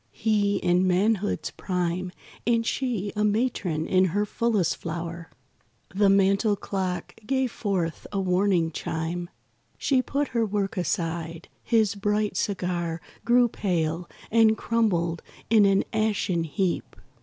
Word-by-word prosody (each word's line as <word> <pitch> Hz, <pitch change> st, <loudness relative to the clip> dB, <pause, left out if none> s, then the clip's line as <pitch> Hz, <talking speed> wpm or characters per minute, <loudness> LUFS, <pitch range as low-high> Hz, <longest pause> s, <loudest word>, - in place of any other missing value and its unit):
He 210 Hz, -2 st, +1 dB
in 180 Hz, -1 st, +2 dB
manhood's 205 Hz, +3 st, +1 dB
prime 180 Hz, -1 st, -2 dB, 0.4 s
And 230 Hz, -1 st, +2 dB
she 225 Hz, -6 st, -2 dB
a 210 Hz, -, +1 dB
matron 205 Hz, -7 st, 0 dB
in 185 Hz, 0 st, +3 dB
her 205 Hz, +4 st, 0 dB
fullest 210 Hz, -6 st, 0 dB
flower. 165 Hz, 0 st, -5 dB, 0.6 s
The 200 Hz, +1 st, +4 dB
mantel 195 Hz, +2 st, +3 dB
clock 190 Hz, -2 st, -3 dB
gave 265 Hz, -2 st, +1 dB
forth 185 Hz, -8 st, -2 dB
a 200 Hz, -, -1 dB
warning 180 Hz, -3 st, +2 dB
chime. 165 Hz, +3 st, -3 dB, 0.5 s
She 265 Hz, -3 st, +2 dB
put 280 Hz, +2 st, -1 dB
her 230 Hz, -1 st, +1 dB
work 205 Hz, -2 st, -1 dB
aside; 165 Hz, -1 st, -3 dB
his 220 Hz, -4 st, +2 dB
bright 210 Hz, +1 st, 0 dB
cigar 175 Hz, -4 st, -1 dB, 0.3 s
Grew 240 Hz, +1 st, +5 dB
pale, 170 Hz, -5 st, -2 dB, 0.2 s
and 220 Hz, -1 st, +5 dB
crumbled 175 Hz, -9 st, 0 dB, 0.3 s
in 215 Hz, -3 st, +6 dB
an 195 Hz, 0 st, +3 dB
ashen 205 Hz, -6 st, 0 dB
heap. 180 Hz, +2 st, -2 dB
195 Hz, 125 wpm, -26 LUFS, 175-215 Hz, 0.6 s, in